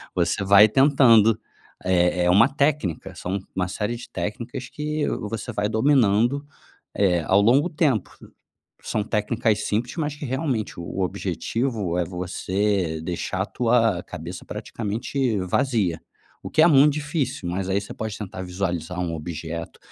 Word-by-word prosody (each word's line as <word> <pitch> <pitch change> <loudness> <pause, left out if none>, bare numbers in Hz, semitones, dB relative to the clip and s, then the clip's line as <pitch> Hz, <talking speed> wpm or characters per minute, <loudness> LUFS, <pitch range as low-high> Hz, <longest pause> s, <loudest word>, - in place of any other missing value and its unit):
Você - - +1
vai 100 +2 +7
tentando. 115 -5 +5 0.5
É 90 -1 +2
é - - +3
uma 100 +8 +6
técnica, 135 - -1
são 90 +3 -3 0.2
uma 90 -1 0
série 105 +5 -3
de 120 - -10
técnicas 125 +4 -5
que 150 0 -2 0.3
você 110 -3 -4
vai 105 0 0
dominando, 120 +2 +2 0.5
eh, 90 -4 +2
ao 95 +1 +4
longo 135 +10 +4
tempo. 145 - +1 0.7
São 105 - -2
técnicas 110 +1 0
simples, 115 - -2
mas 150 -3 -2
que 150 - -7
realmente, 130 - -2
o - - -6
o - - +1
objetivo 110 -1 -2
é 90 - +1
você 90 0 -1
deixar 90 +2 -2
a - - -3
tua 115 -6 +2
cabeça 90 +1 -8
praticamente 115 +2 -2 0.2
vazia, 110 - +1 0.4
o - - -7
que 155 - +4
é - - +7
muito 145 -1 +6
difícil, 150 - -2
mas 95 +1 -3
aí 100 +1 +1
você 105 - -9
pode 110 -2 -4
tentar 95 -3 -6
visualizar 90 -2 -3
um 85 -2 -2
objeto. 80 +1 -6
105 Hz, 150 wpm, -24 LUFS, 90-130 Hz, 0.7 s, vai